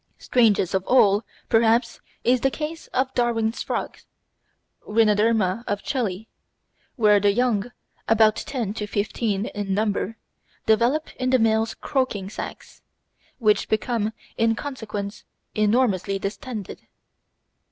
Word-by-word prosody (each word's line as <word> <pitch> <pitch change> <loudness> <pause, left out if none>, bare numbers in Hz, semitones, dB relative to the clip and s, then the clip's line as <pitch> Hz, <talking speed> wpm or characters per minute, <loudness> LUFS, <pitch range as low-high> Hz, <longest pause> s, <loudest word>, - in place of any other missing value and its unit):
Strangest 215 -7 +2
of 190 -1 +1
all, 210 -4 +5 0.2
perhaps, 230 +1 +2 0.2
is 245 0 +3
the 270 - +3
case 315 +4 -5
of 260 +1 -1
Darwin's 230 -1 0
Frog - - -3 0.9
(Rhinoderma 215 -1 +2
of 205 0 -2
Chili), 220 -6 -2 0.7
where 210 -4 +5
the 200 0 +3
young, 240 0 0 0.4
about 220 -1 +5
ten 240 -7 -3
to 210 -1 -4
fifteen 205 0 -1
in 205 -3 -3
number, 215 +1 -1 0.5
develop 240 +8 +2
in 255 0 -1
the 260 - +5
male's 225 -1 +1
croaking 215 -8 -2
sacs, - - -8 0.6
which 215 -3 +2
become 220 -1 0 0.3
in 225 0 +2
consequence 215 -6 -6 0.3
enormously 210 -3 +1
distended. 210 +1 -6
220 Hz, 115 wpm, -24 LUFS, 205-245 Hz, 0.9 s, all